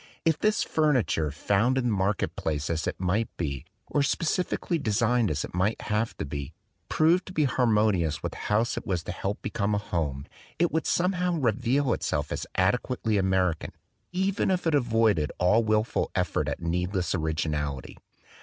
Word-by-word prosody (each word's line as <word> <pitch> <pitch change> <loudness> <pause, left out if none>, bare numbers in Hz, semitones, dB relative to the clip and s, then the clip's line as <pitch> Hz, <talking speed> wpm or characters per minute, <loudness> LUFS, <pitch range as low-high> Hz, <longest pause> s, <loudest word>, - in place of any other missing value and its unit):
If 160 -2 +2
this 215 0 +2
furniture, 130 - +1
found 100 - +1
in 130 - +1
the 120 - +1
market 95 +1 0
place 75 -1 -2
as 80 -2 -2
it - - -3
might 95 +5 0
be, 70 -6 -3 0.2
or 145 - 0
specially 165 +3 0
designed 115 -1 +2
as 75 0 -1
it - - -12
might 95 +5 0
have 105 +2 -1
to - - -3
be, 70 -1 -5 0.4
proved 170 +4 +3
to 185 - -8
be 155 - +2
harmonious 105 - +2
with - - -2
the - - -10
house 110 +3 +1
it - - -5
was 90 -4 -1
to - - -5
help 100 +2 -4
become 105 0 -1
a - - +1
home, 75 -9 -2 0.3
it 175 +1 +2
would 160 - 0
somehow 180 0 +1
re 130 -8 +2
veal 125 +3 +1
itself - - -2
as - - -3
adequately 110 +2 +1
American, 95 -3 0 0.4
even 190 +2 0
if 185 -2 0
it 165 - +2
avoided 115 - +2
all 105 +6 +4
wilful 110 0 +1
effort - - 0
at - - -5
needless 90 +2 -1
originality. 75 -5 -2
105 Hz, 175 wpm, -27 LUFS, 85-135 Hz, 0.4 s, all